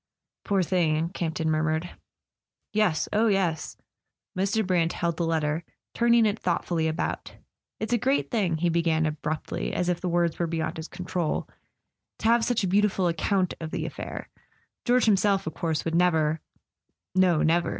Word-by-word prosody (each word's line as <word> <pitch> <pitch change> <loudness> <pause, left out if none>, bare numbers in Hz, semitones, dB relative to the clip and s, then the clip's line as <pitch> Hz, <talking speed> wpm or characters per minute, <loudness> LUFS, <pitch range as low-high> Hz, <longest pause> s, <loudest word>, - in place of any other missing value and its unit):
"Poor 195 -3 +1
thing!" 165 -2 +1
Camp 170 -3 -3
ton 160 - -1
murmured. 155 +2 0 0.8
"Yes—oh, 215 +2 +2
yes!" 185 -6 0 0.6
Mr. 200 +3 +1
Brant 175 -3 +1
held 170 -1 -1
the 170 - 0
letter, 160 0 0 0.3
turning 235 -1 +4
it 210 +1 0
thoughtfully 170 -2 0
about. 160 +1 -3 0.4
"It's 220 +2 -2
a 240 - +3
great 270 +5 +1
thing," 190 -9 +1
he 175 +2 +1
began 165 -1 +2
abruptly, 155 0 -3
as 180 - 0
if 175 - -1
the 180 - -1
words 170 -1 +1
were 170 - +1
beyond 160 -1 -2
his 160 0 -6
control, 175 -2 -2 0.7
"to - - -8
have 230 +1 +4
such 230 -2 +1
a - - +1
beautiful 195 -1 +2
account 180 +2 +1
of 160 - -4
the - - -3
affair. - - -6 0.6
George 250 0 +4
himself, 200 -2 +3
of 160 - -4
course, 160 -2 -2
would 165 - -1
never 160 -3 +2 0.3
" - - -54
"No, 185 -4 +3
never." 170 +2 +2
175 Hz, 165 wpm, -26 LUFS, 160-200 Hz, 0.8 s, turning